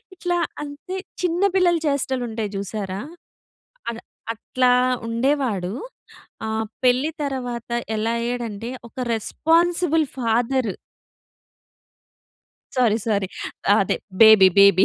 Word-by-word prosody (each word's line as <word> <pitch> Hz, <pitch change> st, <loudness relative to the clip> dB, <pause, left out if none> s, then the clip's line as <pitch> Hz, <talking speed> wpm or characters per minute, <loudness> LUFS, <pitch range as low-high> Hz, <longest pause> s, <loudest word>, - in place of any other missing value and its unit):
ఇట్లా 355 Hz, -1 st, -1 dB, 0.3 s
అంతె 295 Hz, +6 st, -7 dB, 0.2 s
చిన్న 355 Hz, +1 st, 0 dB
పిల్లల 360 Hz, -2 st, +4 dB
చేష్టలుంటాయి 245 Hz, -6 st, -1 dB
చూసారా, 195 Hz, -1 st, -4 dB, 0.9 s
అద్ 230 Hz, -, -7 dB, 0.3 s
అట్లా 250 Hz, +2 st, +1 dB, 0.4 s
ఉండేవాడు. 230 Hz, -6 st, 0 dB, 0.7 s
ఆహ్, 220 Hz, 0 st, -1 dB, 0.2 s
పెళ్లి 255 Hz, +5 st, +3 dB
తర్వాత 245 Hz, -4 st, -4 dB, 0.3 s
ఎలా 225 Hz, +2 st, 0 dB
అయ్యాడంటే, 235 Hz, -2 st, -3 dB, 0.2 s
ఒక -, -, -33 dB, 0.2 s
రెస్పాన్సిబుల్ 325 Hz, -, +2 dB
ఫాదర్. 240 Hz, 0 st, +1 dB, 2.0 s
Sorry, 235 Hz, -4 st, +3 dB
sorry. 200 Hz, -3 st, +1 dB, 0.5 s
అదే 195 Hz, -, +1 dB, 0.2 s
బేబీ 220 Hz, -4 st, +9 dB
బేబీ. 200 Hz, -1 st, +7 dB
240 Hz, 90 wpm, -22 LUFS, 220-285 Hz, 2.0 s, బేబీ